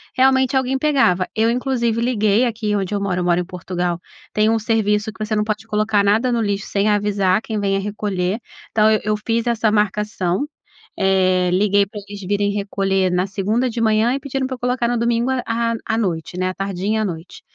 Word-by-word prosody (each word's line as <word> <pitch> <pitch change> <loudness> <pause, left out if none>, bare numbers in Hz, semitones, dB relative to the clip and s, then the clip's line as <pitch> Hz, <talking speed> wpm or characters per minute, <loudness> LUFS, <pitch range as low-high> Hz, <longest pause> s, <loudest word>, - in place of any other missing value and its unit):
realmente 265 0 +3
alguém 265 0 +1
pegava. 265 -12 +2
Eu 225 +1 +3
inclusive 235 -2 0
liguei, 230 -1 +2
aqui 220 -3 -1
onde 195 0 -2
eu 200 - -1
moro 180 -2 -1
eu - - -1
moro 175 0 +2
em 175 - -2
Portugal, 180 -1 -3 0.3
tem 215 +1 +3
um 225 - +2
serviço 215 -1 0
que 215 - -5
você 215 0 -1
não 210 - +1
pode 215 0 -3
colocar 210 -1 +1
nada 220 +5 +2
no 235 - +1
lixo, 200 -2 -2
sem 200 +1 0
avisar 205 -2 +2
quem 220 -2 -3
venha 195 -1 +1
recolher. 200 0 -2 0.3
Então, 215 -1 +2
ah, 215 -1 +4
eu 210 0 +1
fiz 230 +1 0
essa 225 -2 +2
marcação, 210 +1 0 0.5
eh, 185 -1 +3
liguei 200 +1 +3
pra 210 0 -8
eles 205 0 -8
virem 205 +2 0
recolher 195 -2 0
na 180 +1 +1
segunda 205 +6 0
de 230 0 -3
manhã 220 +2 +3
e 275 - -1
pediram 270 -1 -3
pra 260 - -4
eu - - -16
colocar 250 -1 0
no 245 - 0
domingo 235 +2 +1
à 230 0 -1
à 225 - 0
noite, 180 -5 -2
né, 185 0 0
à - - -4
tardinha, 195 +3 -2
à - - 0
noite. 170 -1 -7
210 Hz, 210 wpm, -20 LUFS, 195-230 Hz, 0.5 s, ah